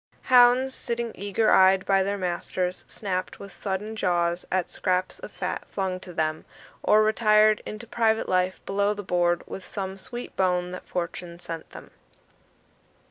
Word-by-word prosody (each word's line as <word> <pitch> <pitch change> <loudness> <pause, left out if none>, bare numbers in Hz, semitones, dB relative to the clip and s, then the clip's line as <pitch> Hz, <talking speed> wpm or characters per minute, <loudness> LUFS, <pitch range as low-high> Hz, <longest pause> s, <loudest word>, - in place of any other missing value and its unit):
Hounds, 250 +2 +6
sitting 235 -2 -3
eager 205 +3 0
eyed 190 0 +5
by 195 -1 +3
their 200 +1 -1
masters, 180 0 -3
snapped 185 -3 -4
with 200 -1 -11
sudden 210 +2 -4
jaws 175 -3 0
at 185 -2 0
scraps 185 0 -1
of - - -9
fat - - -4
flung 190 -2 -2
to 180 - -10
them, 155 -1 -1 0.4
or 215 0 +5
retired 215 -1 +4
into 215 +2 -7
private 225 -1 +1
life 185 0 0
below 200 +1 +1
the 205 - -6
board 175 -1 +1
with 190 - -8
some 190 0 -5
sweet 240 +5 -7
bone 180 -1 +1
that 185 - -8
fortune 170 -1 -4
sent 165 -2 -7
them. - - -12
190 Hz, 155 wpm, -26 LUFS, 180-215 Hz, 0.4 s, Hounds